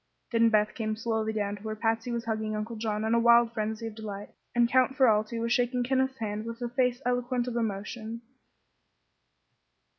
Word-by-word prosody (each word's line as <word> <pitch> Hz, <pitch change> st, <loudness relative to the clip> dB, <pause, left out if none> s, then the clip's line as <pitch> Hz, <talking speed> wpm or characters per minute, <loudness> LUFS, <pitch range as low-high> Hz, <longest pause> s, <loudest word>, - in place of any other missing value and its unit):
Then 230 Hz, -1 st, +4 dB
Beth 215 Hz, -1 st, +2 dB
came 215 Hz, -2 st, -2 dB
slowly 220 Hz, -1 st, -1 dB
down 205 Hz, -1 st, -2 dB
to -, -, -15 dB
where 215 Hz, 0 st, -4 dB
Patsy 225 Hz, +2 st, -1 dB
was 235 Hz, -1 st, -3 dB
hugging 220 Hz, -1 st, -2 dB
Uncle 215 Hz, +2 st, -4 dB
John 215 Hz, -1 st, -2 dB
in 220 Hz, -, +1 dB
a 235 Hz, -, +4 dB
wild 235 Hz, 0 st, +5 dB
frenzy 220 Hz, 0 st, -3 dB
of 225 Hz, -, -5 dB
delight, 210 Hz, -2 st, -7 dB, 0.3 s
and 240 Hz, 0 st, +5 dB
Count 260 Hz, +2 st, +2 dB
Ferralti 225 Hz, -3 st, +3 dB
was 230 Hz, +1 st, 0 dB
shaking 245 Hz, 0 st, +1 dB
Kenneth's 265 Hz, +1 st, 0 dB
hand 210 Hz, -1 st, -3 dB
with 230 Hz, 0 st, -6 dB
a 240 Hz, -, -2 dB
face 250 Hz, +1 st, 0 dB
eloquent 245 Hz, 0 st, 0 dB
of 245 Hz, -, -3 dB
emotion. 225 Hz, +1 st, -3 dB
230 Hz, 185 wpm, -28 LUFS, 215-240 Hz, 0.3 s, wild